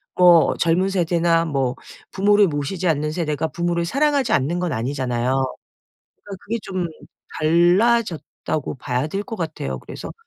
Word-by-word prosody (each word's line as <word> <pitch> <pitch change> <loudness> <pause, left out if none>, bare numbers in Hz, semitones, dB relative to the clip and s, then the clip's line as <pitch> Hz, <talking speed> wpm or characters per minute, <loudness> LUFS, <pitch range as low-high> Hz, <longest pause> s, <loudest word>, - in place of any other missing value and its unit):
뭐 175 -2 +6
젊은 175 +3 +2
세대나 170 -2 +1
뭐 135 -5 -1 0.4
부모를 205 +1 +4
모시지 165 +4 -2
않는 150 0 0
세대가 160 -2 -1
부모를 170 +2 -1
사랑하지 275 - +1
않는 165 +4 +1
건 180 -4 -1
아니잖아요. 125 0 -1
어 135 -1 -2 0.7
'그게 225 +5 -4
좀 185 -2 -3 0.5
달라졌다.'고 175 - +1
봐야 125 +3 -2
될 195 +6 -3
것 225 +1 -7
같아요. 155 - -4
그래서 - - -9
170 Hz, 305 characters per minute, -21 LUFS, 145-190 Hz, 0.7 s, 뭐